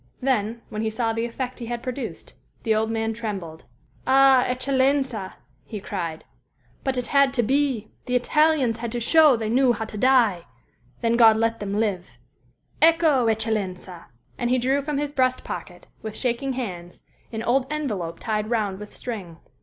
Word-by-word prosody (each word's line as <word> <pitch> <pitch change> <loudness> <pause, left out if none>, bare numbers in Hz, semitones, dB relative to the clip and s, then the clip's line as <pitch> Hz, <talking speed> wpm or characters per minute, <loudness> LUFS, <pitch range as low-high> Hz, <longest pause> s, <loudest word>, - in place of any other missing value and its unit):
Then, 235 -3 -1
when 215 - -4
he 220 - 0
saw 225 +1 -1
the 225 +1 -1
effect 250 +2 -5
he 235 - -6
had 240 0 -4
produced, 255 +1 -6 0.3
the 225 - +2
old 220 +1 +1
man 225 0 -1
trembled. 195 -8 -6 0.4
"Ah, 270 -1 +6
eccellenza," 260 -4 0 0.3
he 205 +10 -7
cried, 170 -5 -5 0.6
"but 265 -1 -1
it 250 - -1
had 280 0 +3
to 240 - +2
be! 260 -3 0 0.2
The 250 - 0
Italians 280 -2 +2
had 230 0 -5
to 240 - -1
show 300 +3 +6
they 225 -2 -3
knew 250 +2 +3
how 225 - -4
to 215 -1 -8
die; 230 -9 +3 0.6
then 230 0 +2
God 225 -2 +7
let 230 0 0
them 200 -1 -3
live. 195 -5 -1 0.7
Ecco, 320 -6 +4
eccellenza!" 205 -5 -2 0.3
And 240 - 0
he 255 - +3
drew 265 +3 +1
from 290 0 -3
his 290 0 -2
breast 255 -3 +1
pocket, 175 -2 -7 0.2
with 220 -1 -6
shaking 260 +2 -1
hands, 180 -9 -6 0.3
an 225 -1 -4
old 255 +2 +1
envelope 205 - -3
tied 215 -1 -2
round 210 -5 -1
with 210 0 -10
string. 195 -9 -6
235 Hz, 170 wpm, -24 LUFS, 215-260 Hz, 0.7 s, God